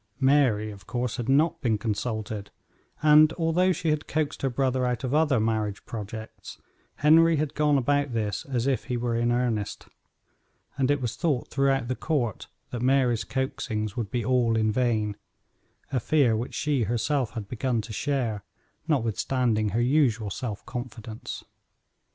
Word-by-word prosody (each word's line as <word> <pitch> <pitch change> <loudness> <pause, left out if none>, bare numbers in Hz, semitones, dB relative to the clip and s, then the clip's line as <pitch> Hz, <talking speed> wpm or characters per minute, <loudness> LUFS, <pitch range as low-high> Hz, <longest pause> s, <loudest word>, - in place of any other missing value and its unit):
Mary, 130 -6 +3
of 100 -2 -13
course, 120 0 -2
had 120 0 -3
not 150 +5 +3
been 115 -6 +1
consulted, 110 -1 -3 0.5
and 155 +1 +7
although 175 +2 +2
she 165 -2 -1
had 150 -1 -1
coaxed 155 -1 -2
her 135 - +1
brother 130 0 0
out 125 0 -1
of 130 +1 -2
other 150 -5 +3
marriage 110 -2 -1
projects, 110 0 -8 0.4
Henry 165 +2 +5
had 150 -1 -1
gone 150 -1 +3
about 145 +1 +1
this 105 -4 -2
as 125 -3 0
if 135 -2 0
he 125 -2 -2
were 120 -1 -1
in 120 +1 +1
earnest, 120 -4 -1 0.9
and 135 -1 +1
it 145 -1 +2
was 120 -2 -2
thought 140 -1 -1
throughout 135 -2 +1
the 130 - -1
court 125 - -2 0.2
that 120 - -4
Mary's 125 -3 +2
coaxings 115 -5 -3
would 115 -4 -3
be 120 +2 -2
all 120 -3 +2
in 110 -1 +2
vain 110 -3 0 0.7
a 130 - +1
fear 130 -2 +3
which 115 +3 -4
she 140 -6 0
herself 120 +3 0
had 110 -3 -5
begun 125 +1 -1
to 110 +1 -8
share, 120 -6 -1 0.4
notwithstanding 115 -4 +1
her 115 +4 0
usual 120 -6 +2
self 105 -1 -5
confidence. 120 -2 -7
125 Hz, 160 wpm, -26 LUFS, 110-140 Hz, 0.9 s, and